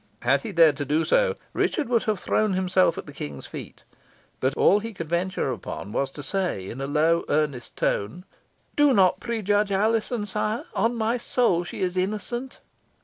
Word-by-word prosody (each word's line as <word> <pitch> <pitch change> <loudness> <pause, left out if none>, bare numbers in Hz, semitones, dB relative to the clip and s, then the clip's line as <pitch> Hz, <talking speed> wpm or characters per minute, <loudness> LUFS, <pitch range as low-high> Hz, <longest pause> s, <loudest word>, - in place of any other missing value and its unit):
Had 130 +3 +3
he 210 - -5
dared 160 -5 +5
so - - 0
to 150 +4 +1
do, - - +3 0.2
Richard 305 -5 0
would 235 -2 +2
have 215 -3 0
thrown 215 -2 +1
himself 185 -2 +2
at - - -6
the 145 - -11
King's 75 - -7
feet, - - -9 0.6
but 130 +2 0
all 205 - +5
he 225 0 -7
could 165 -2 -5
venture 170 -4 -1
upon 105 -2 -6
was 135 +4 -1
to 145 +2 -9
say 140 - -2
in 130 - -6
a 135 - -2
low 160 +3 +2
earnest 145 -5 -1
tone, 110 - -1 0.5
"Do 290 -2 +5
not 190 -2 +4
prejudge 210 -3 0
Alizon, 220 +2 +1
sire. 210 +2 -2
On 230 +4 +1
my 230 +2 0
soul 230 -8 +1
she 175 - -7
is 185 -1 0
innocent!" 215 +7 -3
185 Hz, 185 wpm, -25 LUFS, 150-220 Hz, 0.6 s, dared